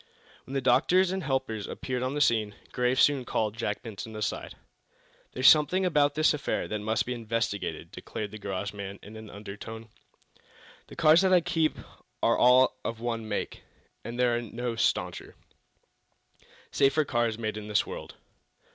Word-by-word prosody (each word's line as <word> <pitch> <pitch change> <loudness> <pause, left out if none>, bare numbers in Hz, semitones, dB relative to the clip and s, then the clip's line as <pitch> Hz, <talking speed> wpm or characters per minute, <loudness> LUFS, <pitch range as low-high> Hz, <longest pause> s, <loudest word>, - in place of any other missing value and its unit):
When 135 - -6
the 135 - +1
doctors 180 +9 +3
and 190 0 -2
helpers 130 - -2
appeared 125 -1 -4
on 130 +2 -2
the 145 - -1
scene 110 -6 +2 0.2
Graves 125 +1 +2
soon 140 -3 +3
called 110 -3 -1
Jack 110 -3 -3
Benson 110 0 -7
aside. 105 -1 -3 0.8
"There's 130 +1 +3
something 170 +5 +5
about 145 -4 +2
this 155 +1 +4
affair 150 - -2
that 105 - -3
must 110 +2 0
be 125 - -3
investigated," 115 -7 -3
declared 105 -2 -6
the 110 - -8
garage 100 0 -4
man, 100 -1 -7
in 105 +2 -11
an 110 -1 -10
undertone. 110 +3 -9 1.0
"The - - -12
cars 155 +3 +6
that 190 -1 +2
I 180 -1 +6
keep 165 -2 0 0.5
are - - +4
all 130 +1 +5
of 115 -1 -4
one 115 -2 -3
make, 105 - -3 0.4
and 120 +1 -6
there 125 -1 +3
are 120 - -1
no 120 +1 -4
stauncher, 115 - -1 1.4
safer 140 +3 +3
cars 120 -4 0
made 110 -2 -3
in 105 -1 -7
the 105 -1 +2
world. - - -8
120 Hz, 165 wpm, -28 LUFS, 110-135 Hz, 1.4 s, cars